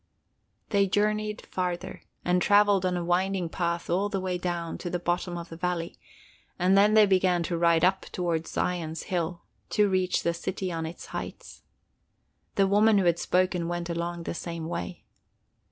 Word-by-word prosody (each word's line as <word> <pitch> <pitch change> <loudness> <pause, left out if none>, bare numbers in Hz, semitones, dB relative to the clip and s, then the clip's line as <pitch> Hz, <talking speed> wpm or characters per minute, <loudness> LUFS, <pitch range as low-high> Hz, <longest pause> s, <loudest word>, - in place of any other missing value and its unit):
They 200 -2 +3
journeyed 210 +2 0
farther, 180 0 -3 0.2
and 180 0 +2
traveled 205 -2 +4
on 180 -1 0
a 175 - -3
winding 180 0 0
path 170 0 -2
all 190 +4 +1
the 200 -2 -2
way 185 -1 -2
down 175 -2 -3
to 175 - -4
the 180 - -1
bottom 175 0 -2
of 170 0 -7
the 165 - -8
valley, 170 -1 -2 0.6
and 185 +1 +3
then 205 +2 +5
they 215 -1 +8
began 185 -3 +2
to 170 +1 -2
ride 170 0 +4
up 190 +1 +1
toward 170 -3 -1
Zion's 165 -3 -2
hill, 170 -1 -3 0.3
to 210 -1 +3
reach 185 -1 +1
the 170 - +1
city 185 +2 -4
on 165 -1 -3
its 165 - -9
heights. - - -7 0.9
The 195 - +4
woman 205 +2 +4
who 195 - +2
had 170 -1 +3
spoken 180 -2 +1
went 175 0 -3
along 170 0 -3
the - - -4
same 170 -1 -5
way. 90 - -5
180 Hz, 175 wpm, -27 LUFS, 170-190 Hz, 0.9 s, they